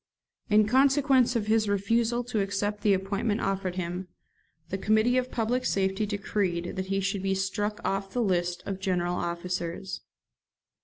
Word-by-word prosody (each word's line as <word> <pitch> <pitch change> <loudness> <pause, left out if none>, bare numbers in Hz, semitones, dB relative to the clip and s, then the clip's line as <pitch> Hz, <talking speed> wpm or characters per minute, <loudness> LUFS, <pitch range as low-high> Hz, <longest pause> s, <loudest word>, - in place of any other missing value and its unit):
In 210 0 +5
consequence 265 +1 +4
of 220 -3 0
his 215 -1 +2
refusal 230 +4 +1
to 230 -3 -1
accept 205 +1 -2
the 205 -3 +4
appointment 200 +3 -1
offered 195 -2 -1
him, 180 0 -4 0.6
the 190 - -2
Committee 220 +4 +3
of 255 0 +1
Public 245 +2 0
Safety 195 -1 0
decreed 195 -4 -2
that 190 0 -3
he 195 0 0
should 195 0 -1
be 195 0 0
struck 205 +3 -2
off 195 0 -1
the 245 +2 0
list 175 -3 0
of 195 -1 -4
general 180 -2 0
officers. 175 +1 -3
200 Hz, 155 wpm, -28 LUFS, 190-220 Hz, 0.6 s, In